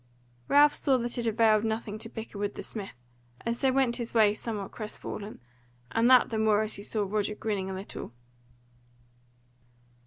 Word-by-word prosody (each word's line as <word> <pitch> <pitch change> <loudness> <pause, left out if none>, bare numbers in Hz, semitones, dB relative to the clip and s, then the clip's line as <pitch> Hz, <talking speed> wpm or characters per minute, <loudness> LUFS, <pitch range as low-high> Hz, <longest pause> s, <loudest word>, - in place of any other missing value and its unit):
Ralph 290 +1 +6
saw 270 -2 +2
that 240 0 -2
it 235 - -1
availed 220 -1 +4
nothing 220 -1 -3
to 225 - -3
bicker 220 -3 -8
with 205 0 -2
the - - -6
smith, 195 - -6 0.4
and 230 0 -1
so 265 +2 +2
went 260 -3 +2
his 235 -1 -5
way 215 -2 +5
somewhat 210 -2 -5
crestfallen, 215 -1 -6 0.5
and 230 +2 +3
that 255 -2 +6
the 220 - -1
more 215 -1 +3
as 215 - -3
he - - -7
saw 210 +1 -1
Roger 210 +1 -1
grinning 205 -3 -2
a - - -4
little. 190 - -7
220 Hz, 175 wpm, -28 LUFS, 210-235 Hz, 0.5 s, Ralph